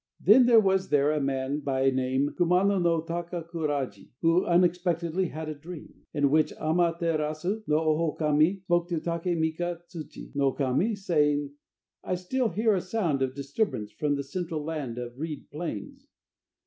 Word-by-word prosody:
Then 240 +7 +6
there 235 -2 +7
was 190 -2 +1
there 145 0 +3
a 150 -1 0
man 135 +1 -1
by 135 -2 +1
name 130 +2 0
Kumano 180 +3 +3
no 165 -2 +2
Takakuraji, 165 - -4
who 165 +2 +3
unexpectedly 175 0 +1
had 160 0 -6
a 155 - -3
dream, 155 +3 -10 0.2
in 145 -2 +1
which 155 0 +3
Ama 165 +1 +1
terasu 165 +5 -1
no 150 - +2
Ohokami 155 +2 +1
spoke 175 -1 +1
to 170 -3 0
Take 170 +1 -2
mika 165 +2 -1
tsuchi 160 -5 -9
no 140 -2 +2
Kami, 145 - +1
saying: 150 -7 +1 0.5
"I 185 - -1
still 230 +7 -1
hear 215 +5 +2
a 190 - +1
sound 180 -8 -1
of 130 -1 -1
disturbance 140 - -2
from 145 -1 -1
the 140 - -3
central 160 +1 -4
land 145 -7 -4
of 120 +1 -7
reed 155 -2 -6
plains. 270 - -6
160 Hz, 160 wpm, -27 LUFS, 145-180 Hz, 0.5 s, there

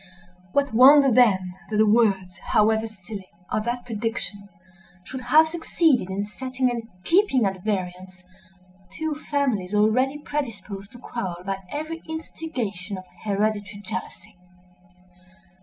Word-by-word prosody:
What 280 +1 +1
wonder 270 +3 +8
then, 195 -7 +4 0.2
that 215 - -1
the 215 - +5
words, 200 -4 +2
however 220 +1 +2
silly, 200 -2 -9 0.2
of 215 0 0
that 240 +1 -2
prediction, 215 -3 -4 0.5
should 260 +7 -7
have 305 +6 +5
succeeded 320 - +1
in 195 +1 -2
setting 255 +3 -2
and 230 -1 -5
keeping 335 - +3
at 190 -2 -2
variance 185 -2 -4 0.7
two 315 -1 -2
families 265 -10 -1
already 255 +7 +3
predisposed 215 -9 -5
to - - -10
quarrel 185 -8 -5
by 195 -1 -2
every 310 - -5
instigation 235 - -5
of 185 - -9 0.2
hereditary 205 -1 -1
jealousy? 185 -1 -7
220 Hz, 125 wpm, -24 LUFS, 195-265 Hz, 0.7 s, wonder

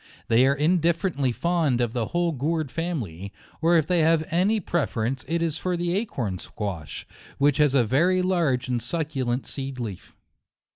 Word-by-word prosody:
They 120 +3 +5
are 140 - +3
indifferently 165 -2 +1
fond 160 -3 +1
of 120 -2 0
the 120 -4 -1
whole 175 -1 0
gourd 155 0 -2
family; 110 - -4 0.3
or 170 +1 +4
if 160 - +2
they 180 +1 +1
have 160 0 +3
any 195 +6 +2
pre 170 -3 0
ference, 120 +4 -2
it 170 +1 0
is 160 -2 -2
for 180 -1 -1
the 175 +1 -1
acorn 120 - -2
squash, 90 -10 -5 0.3
which 140 -1 +3
has 145 -2 +3
a 130 - +5
very 170 - +2
large 165 -9 +1
and 125 -2 -1
succulent 130 -2 -2
seed 135 -2 -5
leaf. 105 -7 -7
150 Hz, 175 wpm, -25 LUFS, 125-170 Hz, 0.3 s, They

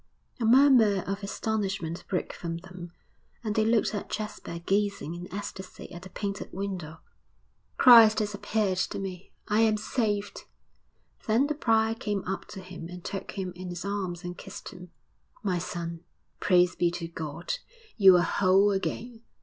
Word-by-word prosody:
A 230 - 0
murmur 235 -6 +6
of 195 +2 -4
astonishment 195 -4 -3
broke 180 - -2
from 165 -1 -4
them, 180 -1 -10 0.5
and 215 -2 -1
they 220 - +2
looked 220 0 +2
at 205 - -4
Jasper 210 -5 -5
gazing 195 -2 -1
in 175 +1 -8
ecstasy 190 -1 -7
at 175 - -8
the 190 - -10
painted 200 0 -4
window. 180 -5 -5 0.8
'Christ 230 -4 +9
has 210 -1 0
appeared 205 -2 0
to - - -1
me.... 190 -1 -6 0.2
I 210 0 +2
am 220 -1 +4
saved!' 210 -2 -2 0.8
Then 230 +5 +4
the 300 - 0
prior 225 -6 +2
came 210 -3 -3
up 190 0 -3
to 190 - -8
him 180 -3 -9
and 180 -1 -10
took 195 - -5
him 185 -2 -4
in 180 0 -7
his 175 +1 -6
arms 190 -3 -3
and 175 0 -5
kissed - - -9
him. 180 0 -11 0.5
'My 185 -4 0
son, 170 -1 -5 0.4
praise 180 -1 +4
be 175 - +2
to 170 -1 -5
God! 165 -1 -5 0.4
you 190 -4 +8
are 175 - +3
whole 195 +2 +4
again.' 225 +4 -3
195 Hz, 165 wpm, -28 LUFS, 180-215 Hz, 0.8 s, Christ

